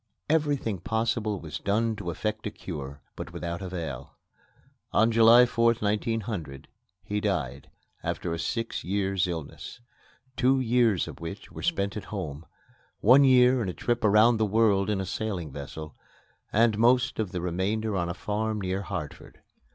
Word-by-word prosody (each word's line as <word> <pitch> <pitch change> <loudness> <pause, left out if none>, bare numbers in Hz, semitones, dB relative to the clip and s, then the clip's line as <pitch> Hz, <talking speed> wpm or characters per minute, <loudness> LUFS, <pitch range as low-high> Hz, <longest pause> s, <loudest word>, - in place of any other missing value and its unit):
Everything 145 - 0
possible 110 0 -1
was 80 -3 -6
done 110 +2 0
to 100 -4 -5
effect 110 +6 -3
a - - -1
cure, 70 -8 -8
but - - -7
without 85 +2 -5
avail. 85 -9 -6 0.7
On 110 +2 +3
July 115 +2 +7
4th, 115 -1 +2
1900, 105 -8 -2 0.4
he 105 +2 -2
died, - - -2 0.3
after 85 - -3
a 85 - -4
six 115 +8 -3
years' 95 -1 0
illness, 85 - -6 0.6
two 130 +1 +3
years 120 -6 +2
of - - -9
which 85 +5 -8
were - - -8
spent 100 -13 -1
at 105 - -5
home, 85 -6 -6 0.5
one 130 +6 +7
year 130 -1 +5
in 100 - -2
a - - -3
trip 120 0 -1
around 110 +3 +5
the 110 - +1
world 105 -2 +3
in 105 -2 0
a 95 - -2
sailing 90 -5 -3
vessel, 75 +2 -8 0.6
and 110 -1 +3
most 125 +2 +3
of 105 -5 -1
the 90 - -3
remainder 100 +5 -1
on 85 -2 -1
a 85 - -4
farm 110 +2 -2
near 95 0 -2
Hartford. 90 -7 -7
105 Hz, 160 wpm, -27 LUFS, 90-115 Hz, 0.7 s, July